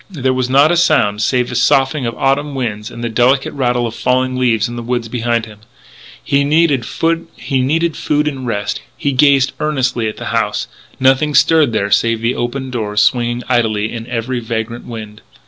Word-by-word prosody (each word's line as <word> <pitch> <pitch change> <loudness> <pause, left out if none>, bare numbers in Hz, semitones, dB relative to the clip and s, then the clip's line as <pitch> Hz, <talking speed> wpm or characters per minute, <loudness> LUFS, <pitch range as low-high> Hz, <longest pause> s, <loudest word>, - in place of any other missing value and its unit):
There 135 -8 -1
was 130 -1 -1
not 140 +4 +5
a 175 - +2
sound 115 -11 +2
save 125 +2 +1
the - - -6
soughing 135 +2 +2
of 115 - -5
autumn 140 +1 0
winds 105 -5 -3
and 120 - -9
the - - 0
delicate 125 +4 +2
rattle 125 -3 0
of 115 - -4
falling 130 +1 0
leaves 120 -3 +1
in 120 - -7
the 120 - -5
woods 120 0 -2
behind 120 0 -1
him. 105 -2 -14 0.6
He 140 0 +1
needed 145 -4 +2
food 160 -1 -1
and 135 -4 -4
rest. 105 -3 -2 0.2
He 140 - -1
gazed 140 0 +3
earnestly 130 -7 0
at - - -9
the - - -7
house. - - -1 0.3
Nothing 135 +3 +2
stirred 155 -2 +4
there 100 -2 -1
save 115 +3 +2
the 115 +2 +1
open 130 +2 -4
doors 105 -4 0
swinging 120 +2 0
idly 110 -4 0
in 115 0 -6
every 120 +1 -3
vagrant 115 0 -4
wind. 110 -2 -8
125 Hz, 180 wpm, -16 LUFS, 115-140 Hz, 0.6 s, not